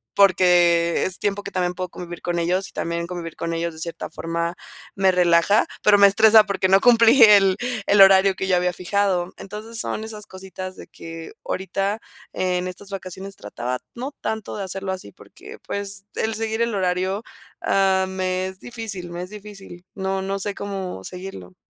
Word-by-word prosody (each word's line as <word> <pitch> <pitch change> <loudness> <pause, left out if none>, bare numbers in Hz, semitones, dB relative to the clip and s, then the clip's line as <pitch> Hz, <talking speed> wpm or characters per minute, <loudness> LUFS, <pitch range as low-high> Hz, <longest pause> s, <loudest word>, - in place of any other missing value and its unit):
porque 175 -3 +4
es 185 - -4
tiempo 205 0 -1
que 200 - -7
también 180 -2 -1
puedo 185 0 -4
convivir 175 0 -8
con 175 -1 -2
ellos, 180 +3 0
y - - -16
también 170 0 -3
convivir 170 -2 -6
con 165 0 -3
ellos 165 0 -2
de 160 - -11
cierta 170 0 -5
forma 170 +1 -3 0.4
me 195 -1 +3
relaja, 180 +3 +3 0.2
pero 210 -1 +6
me 200 0 +8
estresa 215 +2 +6
porque 195 -2 0
no 195 +1 +6
cumplí 235 +1 +6
el 200 -3 +7 0.3
el 200 0 +5
horario 195 0 +7
que 190 - -3
yo 185 - +3
había 180 0 +1
fijado. 185 -1 0
Entonces, 215 +3 -8
son 220 - -3
esas 215 -1 -8
cositas 190 0 -8
de - - -11
que 165 0 -10
ahorita 195 +2 -2 0.3
en 180 -1 -1
estas 190 +2 -10
vacaciones 195 0 -7
trataba, 120 +4 -4 0.2
no 260 +4 -5
tanto 220 -2 -4
de 200 - -3
hacerlo 190 0 -3
así 185 - -8
porque, - - -14
pues, 200 -1 -4
el 220 0 -1
seguir 220 +1 -2
el 235 -2 0
horario, 185 +2 -1 0.4
ah, 190 -1 +2
me 185 0 -1
es 190 0 -9
difícil 220 -7 -6
me 175 +1 -5
es 180 - -7
difícil. 195 -4 -11
No 190 0 -2
no 195 +1 -3
sé 200 +1 -3
cómo 190 - -5
seguirlo. 185 - -8
190 Hz, 185 wpm, -22 LUFS, 180-200 Hz, 0.4 s, me